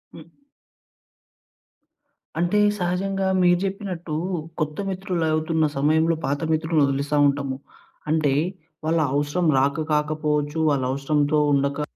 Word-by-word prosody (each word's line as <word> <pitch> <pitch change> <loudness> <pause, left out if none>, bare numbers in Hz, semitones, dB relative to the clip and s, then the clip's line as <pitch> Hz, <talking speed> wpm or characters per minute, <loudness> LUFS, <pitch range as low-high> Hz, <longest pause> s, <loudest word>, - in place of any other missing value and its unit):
హ్మ్. 165 +1 -13 2.1
అంటే, 175 +4 +2 0.2
సహజంగా 190 +2 -1
మీరు 175 0 +4
చెప్పినట్టు 190 -5 -4 0.5
కొత్త 150 -1 -2
మిత్రులు 185 -3 -2
అవుతున్న 160 0 +1
సమయంలో 160 +4 +2
పాత 140 +1 -1
మిత్రుల్ని 160 -1 +1
వదిలేస్తా 140 +2 -1
ఉంటాము. 140 -1 -2 0.5
అంటే, 155 -3 +2 0.5
వాళ్ళ 165 +1 +2
అవసరం 145 +5 0
రాక 140 +4 0
కాకపోవచ్చు. 150 0 0
వాళ్ళ 140 -2 0
అవసరంతో 145 +2 +1 0.2
ఉండక 140 +1 0
155 Hz, 105 wpm, -23 LUFS, 145-175 Hz, 2.1 s, మీరు